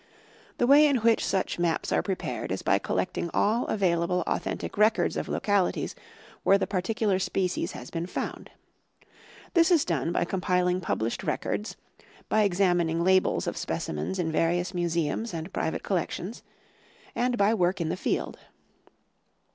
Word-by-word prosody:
The - - +2
way 290 +4 +7
in 285 - +2
which 230 -2 +3
such 190 -2 -1
maps 170 -2 0
are - - +3
prepared 190 -2 -4
is - - -3
by - - +3
collecting 170 - -2
all 225 +4 +2
available 180 -3 +1
authentic - - -3
records 215 +2 +3
of - - -3
localities 200 -3 0 0.5
where 195 - +5
the - - -1
particular 200 0 0
species 185 -1 -1
has - - -9
been 170 0 -3
found. - - -5 1.0
This 335 -1 +5
is 335 -5 +4
done 165 -2 -1
by 175 - +1
compiling 180 0 0
published 115 -8 -2
records, 210 - -2 0.5
by 215 -2 +3
examin 175 -2 +2
ing 165 +1 0
labels 185 +1 +3
of - - -3
specimens 75 - -3
in 170 -3 -1
various 175 +3 0
museums 170 +4 -1
and 165 +3 -6
private 160 - -2
collec 180 -5 0
tions, 200 +7 -6 0.7
and 245 0 0
by 205 +2 +3
work 185 -2 +1
in 165 -2 -1
the 175 - -1
field. - - -2
185 Hz, 155 wpm, -27 LUFS, 170-210 Hz, 1.0 s, way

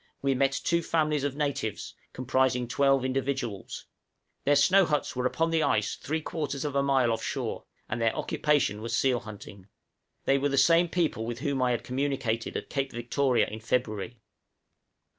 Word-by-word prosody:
we 135 -1 +2
met 135 +1 +2
two 170 0 +2
families 155 -3 0
of 140 -1 -1
natives, 140 -8 -3 0.2
comprising 130 -1 +1
twelve 135 +1 +2
individuals; 130 -5 -3 0.6
their 145 - +4
snow 180 +8 +5
huts 150 -6 -1
were 125 0 +1
upon 165 +5 0
the 165 -1 +2
ice 110 -7 +1
three 160 +3 -3
quarters 150 -4 -3
of 145 - -2
a 140 - +3
mile 135 -4 +2
off 115 - -3
shore, - - -3 0.2
and 115 +1 -3
their 115 -1 +2
occupation 145 -9 0
was 115 +1 -2
seal 130 -2 +2
hunting. 100 -3 -11 0.6
They 135 0 +3
were 145 +1 +1
the 140 - -1
same 165 +5 +5
people 160 -11 0
with 120 +1 -5
whom 140 -2 -1
I 125 - +3
had 120 - -1
communicated 130 -4 -2
at - - -6
Cape 135 -1 -2
Victoria 120 +2 +1
in 110 - -7
February. 115 -1 -2
135 Hz, 175 wpm, -28 LUFS, 120-145 Hz, 0.6 s, snow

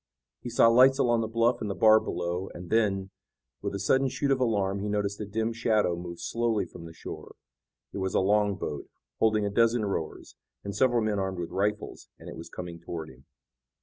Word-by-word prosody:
He 120 - -6
saw 115 0 +5
lights 130 +3 +6
along 120 -1 +2
the 110 - -2
bluff 115 +2 +1
and 105 - -3
the 100 - -3
bar 110 +5 +6
below, 90 -1 -3
and 85 0 -9
then, 100 -4 +1 0.5
with - - -3
a - - -3
sudden 135 0 +2
shoot 140 +2 -1
of 135 - +2
alarm 100 -5 0
he 105 +1 -3
noticed 100 0 -2
a 105 - -4
dim 110 +3 -1
shadow 110 -6 +1
move 85 0 -7
slowly 115 +4 0
from 85 - -11
the 85 - -9
shore. - - -9 0.6
It - - -4
was 95 -1 -2
a - - +4
long 105 +1 +2
boat, 75 -7 -5 0.3
holding 110 -2 +2
a 100 - -1
dozen 115 +1 +3
rowers, 80 -6 -4 0.3
and 100 - -5
several 120 -3 +3
men 105 -2 0
armed 95 -1 -2
with 85 -1 -5
rifles, 105 +3 -2
and - - -11
it - - -8
was - - -9
coming 85 -1 -7
toward 85 -2 -6
him. 65 +1 -19
105 Hz, 215 wpm, -28 LUFS, 95-115 Hz, 0.6 s, lights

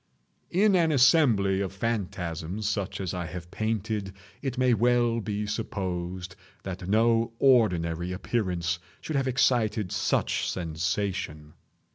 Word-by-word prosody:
In 200 +2 +3
an 165 -3 +3
assembly 120 - +4
of 95 - -2
phantasms 95 -3 -3
such 100 -2 -2
as 95 -2 -3
I 90 -2 -3
have 90 0 -8
painted, 110 -2 -2 0.3
it 135 -2 -3
may 130 -1 +3
well 120 +1 +2
be 105 0 -3
supposed 95 -3 -4 0.3
that 95 -1 -6
no 115 +2 +3
ordinary 90 -10 +3
appearance 90 -4 -1 0.3
could 155 - -3
have 135 -1 +1
excited 110 -6 +1
such 100 0 0
sensation. 85 -2 -3
100 Hz, 120 wpm, -27 LUFS, 90-115 Hz, 0.3 s, assembly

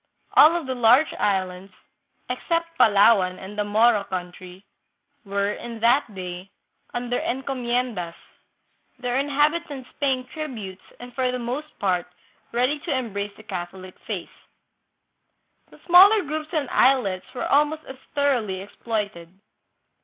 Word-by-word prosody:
All 315 +3 +7
of 325 - -9
the 260 - -2
large 245 +5 +4
islands, 190 -1 -1 0.6
except 335 -1 -2
Palawan 200 -3 +5
and 190 +3 -9
the 210 - 0
Moro 215 +1 +3
country, 180 0 -7 0.6
were, 200 +1 -1
in 235 -1 -8
that 235 -2 +2
day, 180 0 -7 0.4
under 245 0 -2
encomiendas, 245 -8 -2 0.8
their 250 0 -1
inhabitants 290 -1 0
paying 265 -3 0
tributes 225 - -6 0.2
and 245 0 -10
for 255 0 0
the 250 - -2
most 255 +6 -5
part 180 -3 0 0.4
ready 255 +5 +1
to 320 +2 -5
embrace 205 -5 -4
the 215 - -14
Catholic 185 -2 -7
faith. - - -5 1.4
The - - -18
smaller 385 +4 +7
groups 310 0 -4
and 305 -5 -1
islets 205 -9 +2
were 245 - -3
almost 300 +2 +2
as 265 - -9 0.2
thor 285 -1 +3
oughly 195 -5 -4
exploited. 200 -4 -5
240 Hz, 130 wpm, -24 LUFS, 195-280 Hz, 1.4 s, All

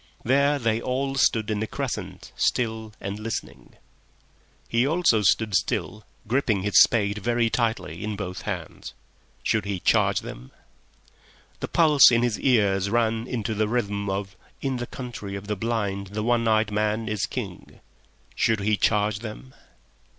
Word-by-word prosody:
There 140 +4 +3
they 115 -3 0
all 135 +2 -1
stood 115 -4 +2
in 105 -1 -1
a 110 - -2
crescent, - - -5
still 110 -2 -1
and 100 +1 -5
listening. 110 0 -6 0.9
He 115 +1 +2
also 155 -8 +3
stood 105 +2 +2
still, 105 +3 -1 0.2
gripping 110 -5 +1
his 105 0 +6
spade 105 -3 +3
very 120 +1 +1
tightly 100 -7 -1
in 105 0 -3
both 90 -2 -5
hands. - - -6 0.5
Should - - +1
he 100 -2 -3
charge - - +2
them? - - -9 1.1
The - - -3
pulse 150 -5 +6
in 120 0 +3
his 120 -3 0
ears 100 -6 +2
ran 115 +1 0
into 115 -4 -2
the 110 0 0
rhythm 100 -3 -1
of 95 0 -3 0.2
"In 135 -2 -2
the 120 0 -4
Country 115 -6 -7
of 100 0 -7
the 105 +1 -2
Blind 100 -2 -2
the 105 +2 -4
One 115 0 +1
Eyed 110 -1 +2
Man 105 +1 0
is 105 -2 -1
King." 100 -9 -7 0.5
Should 110 -3 +1
he 105 +1 +1
charge 105 -1 +1
them? 120 +4 -9
110 Hz, 155 wpm, -25 LUFS, 100-120 Hz, 1.1 s, his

